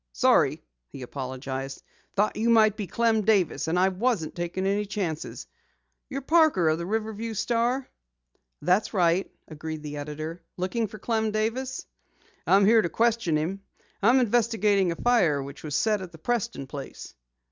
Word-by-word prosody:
"Sorry," - - +3 0.3
he 130 - -9
apologized. 130 +1 -5 0.3
"Thought 210 +1 +1
you 225 +2 0
might 215 -2 +5
be 210 -3 -5
Clem 230 0 +2
Davis, 190 -9 +1
and 165 +2 0
I 185 +1 +4
wasn't 190 -3 -1
taking 175 +2 -3
any 200 +2 +1
chances. 180 -7 -4 0.6
You're 275 -1 -4
Parker 310 - +4
of 155 +1 +1
the 170 - -4
Riverview 220 +1 -3
Star?" 240 +4 0 0.8
"That's 190 +5 +2
right," 175 0 +2 0.2
agreed 155 0 -7
the 150 -1 -6
editor, 155 +3 -6 0.2
"Looking 215 +5 -1
for 215 - -10
Clem 220 +1 0
Davis?" 230 +5 -2 0.6
"I'm 195 +1 +5
here 225 +2 +6
to 170 - -2
question 225 -6 +1
him. 180 +6 -3 0.4
I'm 240 +6 +5
investigating 215 -5 +2
a - - -3
fire 175 - +2
which 140 +1 -10
was 150 -2 -3
set 210 +3 +1
at 185 -2 -8
the 165 - -12
Preston 235 - -2
place." 140 0 -8
195 Hz, 160 wpm, -26 LUFS, 160-225 Hz, 0.8 s, here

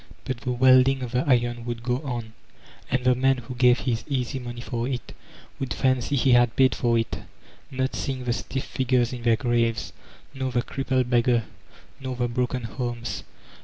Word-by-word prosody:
But 130 - -2
the 125 - -2
welding 130 +1 +5
of 120 - -5
the 125 +1 +1
iron 120 -2 +2
would 120 -1 -4
go 125 0 0
on, 120 -6 -5 0.6
and 130 0 0
the 125 0 +5
man 130 +1 +2
who 125 +1 -7
gave 125 0 +4
his 115 -3 -1
easy 135 -1 -2
money 120 -1 -7
for 120 -1 -3
it 130 -3 -4 0.5
would 135 - -3
fancy 130 +1 +1
he 135 0 +3
had 120 -1 +4
paid 130 -1 +4
for 120 -2 +1
it, 115 -1 -2 0.5
not 130 0 -1
seeii^ 130 -2 -3
the 120 - +1
stiff 135 +2 -3
figures 125 -1 0
in 125 - -6
their 115 -1 +4
graves, 115 -1 0 0.4
nor 130 -1 -3
the 120 0 +1
crippled 130 -2 -1
beg 120 -1 +4
gar, 120 -3 +3 0.6
nor 130 -1 -4
the 120 0 0
broken 125 +1 -1
homes. 120 +2 -4
125 Hz, 190 wpm, -25 LUFS, 120-130 Hz, 0.6 s, welding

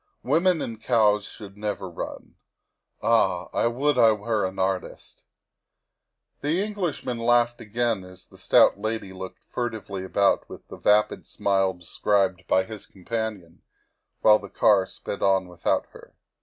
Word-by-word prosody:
Women 170 -2 +2
and 115 -1 -7
cows 105 -3 +3
should 100 -2 -11
never 105 -2 -4
run. 85 - -7 0.7
Ah! 95 -6 +2
I - - +2
would 130 +3 +1
I 115 -2 +6
were 105 -1 -1
an 95 - -9
artist! 95 -1 -3 0.4
' - - -58
' - - -53
The 155 +5 0
Englishman 180 - -3
laughed 120 0 +2
again 115 -2 -1
as 90 0 -13
the - - -19
stout - - +4
lady 110 -2 -3
looked 95 0 -9
furtively 110 -5 -4
about 100 +1 +1
with - - -11
the - - -9
vapid 105 +1 +2
smile 95 -1 +1
described 90 +1 0
by 95 - +3
his 105 +1 -9
companion, 100 -3 -5 0.6
while 105 0 +6
the 100 - -10
car 95 -2 +3
sped 100 - -7
on 95 -1 +2
without 90 -1 -1
her. - - -16
105 Hz, 150 wpm, -25 LUFS, 95-115 Hz, 0.7 s, I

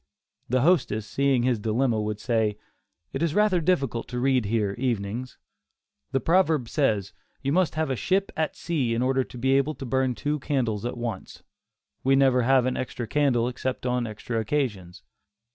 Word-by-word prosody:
The 130 +1 +2
hostess, 135 - +2
seeing 135 +3 +1
his 125 -3 +1
dilemma, 115 +1 +1
would 105 0 -3
say: 110 -2 0 0.6
"It - - -3
is 165 -2 0
rather 210 -4 +3
difficult 140 -9 0
to 125 - -4
read 130 -2 +2
here 105 -2 0
evenings; 120 0 -2 0.7
the 135 - +1
proverb 160 -3 +2
says 105 - 0 0.3
'you 135 - 0
must 175 -1 +2
have 155 -3 0
a - - 0
ship 195 +9 0
at 155 -1 -1
sea 135 -9 -1
in 120 - 0
order 130 0 +2
to 125 - -12
be 130 +2 +1
able 140 +3 +2
to 135 - -7
burn 130 0 0
two 150 +4 -2
candles 120 -7 -1
at 120 - -3
once;' 115 -5 -6 0.6
we 135 +1 +4
never 135 -2 +4
have 130 +1 +4
an 130 - -1
extra 120 -1 -4
candle 130 -3 +2
except 125 +1 -3
on 125 -1 0
extra 110 +2 -4
occasions." 110 -8 -2
130 Hz, 180 wpm, -26 LUFS, 115-140 Hz, 0.7 s, we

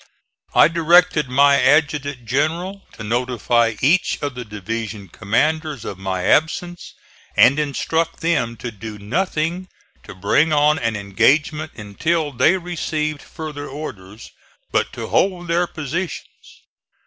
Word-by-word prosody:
I - - +7
directed 165 -3 +3
my 140 +2 +4
adjutant 145 -3 +1
general 165 - -1
to 110 - -9
notify 120 0 +1
each 170 +7 +3
of 145 -2 -2
the 125 0 -6
division 105 -1 -6
commanders 145 - -1
of 95 - -6
my 95 -1 -3
absence 175 - 0 0.4
and 140 +5 +6
instruct 160 +3 -1
them 150 -9 0
to 120 +2 -6
do 105 0 -8
nothing 170 - -2 0.3
to - - -11
bring 140 - +2
on 150 +1 +3
an 115 -1 -1
engagement 145 +10 +1
until 145 +10 -1
they 160 +8 +3
received 155 -4 -3
further 150 -3 -7
orders, 110 -8 -9 0.4
but - - 0
to - - -5
hold 180 -2 0
their 170 +1 +1
positions. 160 +3 -6
145 Hz, 125 wpm, -20 LUFS, 115-160 Hz, 0.4 s, I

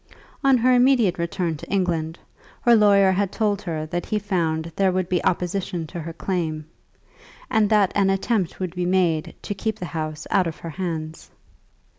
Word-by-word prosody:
On 270 -1 +5
her 255 +2 +3
immediate 245 -8 +3
return 170 -1 -2
to - - -11
England, 170 -4 -1 0.4
her 240 -1 +5
lawyer 200 -3 +5
had 195 0 0
told 205 -2 0
her 160 -4 -4
that 175 +2 -4
he 215 - 0
found 165 -5 -1
there 195 -1 +2
would 185 -1 -1
be 180 -1 0
opposition 180 -1 -1
to 170 +3 -7
her 165 +1 -6
claim, 160 -4 -3 0.9
and 210 -2 +3
that 210 -3 +3
an 195 -1 +2
attempt 195 -1 0
would 185 -3 -3
be 180 -1 -2
made 175 -4 +1
to - - -3
keep 220 +2 -3
the 180 - -5
house 155 -2 -5
out 190 -4 +3
of 160 - -5
her 165 - -6
hands. 160 -2 -5
185 Hz, 180 wpm, -23 LUFS, 165-200 Hz, 0.9 s, On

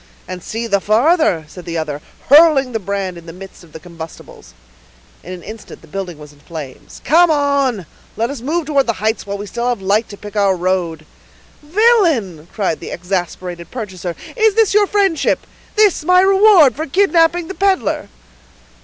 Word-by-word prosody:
"And 185 -1 -7
see 225 +6 -5
the 200 -3 +1
farther," 230 - +2
said 180 +3 -11
the 170 -1 -4
other, 150 -2 -4 0.3
hurling 290 -3 +6
the 225 - -2
brand 195 -2 -4
in 170 - -17
the - - -7
midst 185 +1 -12
of 165 - -18
the 160 - -10
combustibles. 160 - -12 0.7
In 180 - -10
an 180 -1 -8
instant 215 0 -10
the - - -16
building 180 -1 -6
was 150 -1 -13
in 145 - -23
flames. 145 -4 -10
"Come 340 +3 +5
on; 280 - +1 0.3
let 230 +4 -1
us 280 -5 -7
move 315 +6 -2
towards 280 -3 +1
the 230 - +1
heights 215 +1 -2
while 200 0 -3
we 205 - -6
have 240 +2 -2
light 200 +4 0
to 205 - -10
pick 210 +1 -11
our 200 -2 +2
road." 175 -3 -2 0.6
"Villain!" 305 - +2
cried 195 -7 -2
the - - -8
exasperated 180 -1 -4
purchaser, 190 -7 -6 0.2
"is 440 -3 +3
this 450 -4 +3
your 410 0 +4
friendship—this 400 +1 0
my 365 +3 +5
reward 385 - +5
for 315 +3 -4
kidnapping 345 0 +2
the 385 - -6
peddler?" 390 -1 0
215 Hz, 175 wpm, -17 LUFS, -, 0.7 s, hurling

